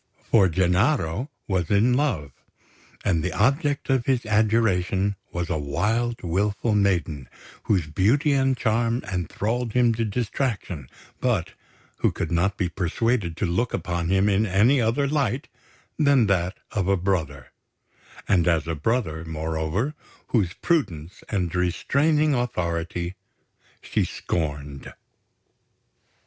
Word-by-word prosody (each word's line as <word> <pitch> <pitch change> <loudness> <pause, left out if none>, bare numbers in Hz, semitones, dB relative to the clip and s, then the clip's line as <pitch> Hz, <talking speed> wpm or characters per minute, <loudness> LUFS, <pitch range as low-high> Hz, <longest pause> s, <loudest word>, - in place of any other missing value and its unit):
For 100 -5 +5
Gennaro 95 - +1 0.2
was 95 -4 0
in 105 +5 +4
love; 125 - 0 0.7
and 85 -6 +1
the 90 - -2
object 140 +6 +1
of 130 -3 +1
his 130 -3 +1
adoration 105 -3 +2 0.2
was 85 -1 -3
a 80 - -1
wild, 115 +11 -1
wilful 100 +5 0
maiden, 85 -10 0 0.4
whose 95 -7 +2
beauty 110 - +2
and 135 -2 +2
charm 115 +1 0
enthralled 105 +6 -2
him 120 -2 +4
to 115 +1 -1
distraction, 105 - -3 0.3
but 115 -10 0 0.4
who - - +2
could - - -4
not 90 +4 +1
be 90 - 0
persuaded 90 +2 -1
to - - 0
look 105 +8 0
upon 85 -2 -2
him 95 +1 +3
in 105 +2 +2
any 110 +8 +4
other 120 +5 +1
light 140 -3 -1 0.5
than 140 -5 +4
that 95 -2 0
of 95 -3 -1
a 100 0 +3
brother 80 -8 -2 0.8
and 90 -5 +3
as 80 -2 +2
a 85 - -1
brother, 80 - -1
moreover, 80 - -2 0.4
whose 100 -6 +1
prudence 90 - -1
and 90 -5 -1
restraining 140 - +2
authority 85 -7 -2 0.7
she - - 0
scorned. 70 -4 -4
100 Hz, 125 wpm, -24 LUFS, 85-120 Hz, 0.8 s, For